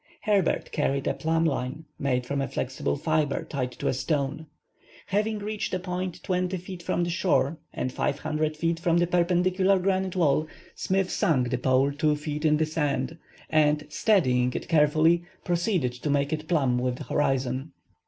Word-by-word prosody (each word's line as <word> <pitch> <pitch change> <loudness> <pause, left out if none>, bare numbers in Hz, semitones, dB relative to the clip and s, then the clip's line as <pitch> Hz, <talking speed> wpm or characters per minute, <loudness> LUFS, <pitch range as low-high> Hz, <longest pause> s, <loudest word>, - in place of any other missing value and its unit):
Herbert 200 -5 +1
carried 140 -2 0
a - - +1
plumb 165 +1 0
line 140 +1 -2
made 125 -3 0
from 140 +2 -1
a 135 - -1
flexible 130 +1 -2
fibre 155 -1 0
tied 130 -3 -3
to - - -4
a - - +2
stone. 140 +3 -2 0.6
Having 215 +2 0
reached 210 -1 -3
a - - -1
point 180 -1 -4
20 180 0 -1
feet 180 0 -8
from 175 - 0
the 170 - -1
shore 165 -4 +1
and 130 - -3
500 150 +2 -1
feet 165 +1 0
from 170 -1 +2
the 175 - +3
perpendicular 180 +2 +2
granite 190 0 0
wall, 155 -3 +2 0.3
Smith 190 0 0
sunk 125 -6 +1
the 125 - +1
pole 130 +2 +3
two 150 +1 +1
feet 150 +1 -4
in 150 -1 +4
the 160 - +2
sand, 150 -1 -2 0.3
and, 150 -1 +2
steadying 125 - +2
it - - -4
carefully, 160 +2 +4 0.2
proceeded 175 - 0
to 125 +5 -4
make 140 +1 +1
it 155 0 -4
plumb 135 -8 +2
with 125 0 -1
the - - -7
horizon. 135 0 -1
155 Hz, 175 wpm, -26 LUFS, 140-180 Hz, 0.6 s, in